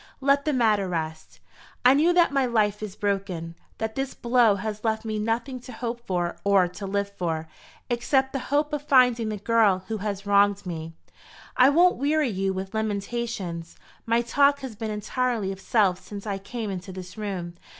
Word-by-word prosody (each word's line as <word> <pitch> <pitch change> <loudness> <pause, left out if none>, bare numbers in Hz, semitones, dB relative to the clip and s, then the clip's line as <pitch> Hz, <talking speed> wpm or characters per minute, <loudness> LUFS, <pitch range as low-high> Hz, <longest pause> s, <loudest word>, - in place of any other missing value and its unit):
Let 280 +1 +2
the 305 - +2
matter 215 -6 +2
rest. 160 -2 -5 0.5
I 250 - +8
knew 310 +5 +4
that 345 -3 +4
my 270 -2 +2
life 210 -3 +1
is 210 -2 -6
broken 195 -5 -2 0.2
that 220 0 -3
this 270 +2 -3
blow 235 -3 +3
has 210 +1 -5
left 220 0 -1
me 215 -1 -2
nothing 230 +4 -2
to 250 +1 -11
hope 235 0 -5
for 175 -2 -1
or 200 -3 +4
to 195 +3 -7
live 200 +1 -1
for, 160 -3 -2 0.4
except 265 +2 +1
the 270 - -1
hope 295 +2 +1
of 295 - -1
finding 250 -5 +4
the 215 - -3
girl 205 -3 +3
who 220 - -1
has 200 0 -4
wronged 200 0 +3
me. 165 -2 -6 0.6
I 255 +1 +6
won't 350 +5 +4
weary 290 +1 +1
you 195 -2 -1
with 190 +1 -5
lamentations. 205 -5 -3 0.3
My 230 +1 +2
talk 280 +4 +3
has 260 -5 -6
been 220 +1 -4
entirely 215 0 -1
of 195 0 -8
self 195 -6 +2
since 200 0 -9
I 200 -2 -3
came 215 +1 -5
into 185 0 -6
this 185 -1 -9
room. 190 -5 -4
215 Hz, 185 wpm, -25 LUFS, 195-245 Hz, 0.6 s, I